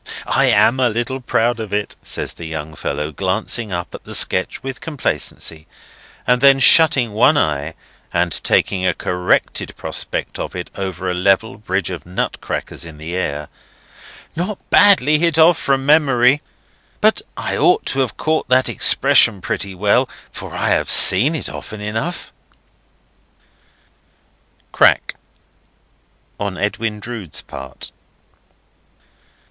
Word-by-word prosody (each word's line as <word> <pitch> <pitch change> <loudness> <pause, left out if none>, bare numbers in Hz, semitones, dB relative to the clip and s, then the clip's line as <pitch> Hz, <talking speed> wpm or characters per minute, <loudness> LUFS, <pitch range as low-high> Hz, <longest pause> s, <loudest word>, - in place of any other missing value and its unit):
"I - - +2
am 130 +3 +3
a 125 -2 +3
little 120 +4 -3
proud 120 -1 0
of 110 -3 -6
it," 105 0 -3
says - - -4
the 85 - -9
young 80 -1 -6
fellow, 75 0 -4
glancing 100 - -1
up 85 -1 -5
at - - -10
the - - -5
sketch - - +1
with 135 +1 -7
complacency, 140 - -3 0.6
and 125 0 +2
then 135 -1 +6
shutting 135 -7 +5
one 135 +8 +4
eye, 75 - -1 0.4
and - - 0
taking 95 -2 +1
a 95 - +1
corrected 90 0 -1
prospect - - -4
of - - -6
it 90 -1 -6
over 95 -2 -5
a 90 - -1
level 100 +4 0
bridge 95 -2 -2
of 90 - -7
nut 90 +1 -4
crackers - - -5
in 80 -2 -10
the 80 +3 -6
air: 75 -5 -3 0.9
"Not 185 +4 -3
badly 155 -8 +5
hit 165 -1 +1
off 165 +1 +5
from 135 -1 0
memory. 140 -2 +3 0.6
But 215 - +2 0.2
I - - -3
ought 370 +5 +2
to - - -1
have 130 -5 -1
caught 155 -4 -1
that 130 0 +3
expression 125 -7 +3
pretty 95 +1 -4
well, 100 +2 +1 0.2
for - - -9
I - - -2
have - - +1
seen 130 - +6
it 155 - -4
often 110 - -8
enough." 110 +12 -5 2.4
Crack!—on 100 -2 -3
Edwin 105 +1 -3
Drood's 105 - -7
part. 65 0 -10
110 Hz, 135 wpm, -18 LUFS, 90-135 Hz, 2.4 s, then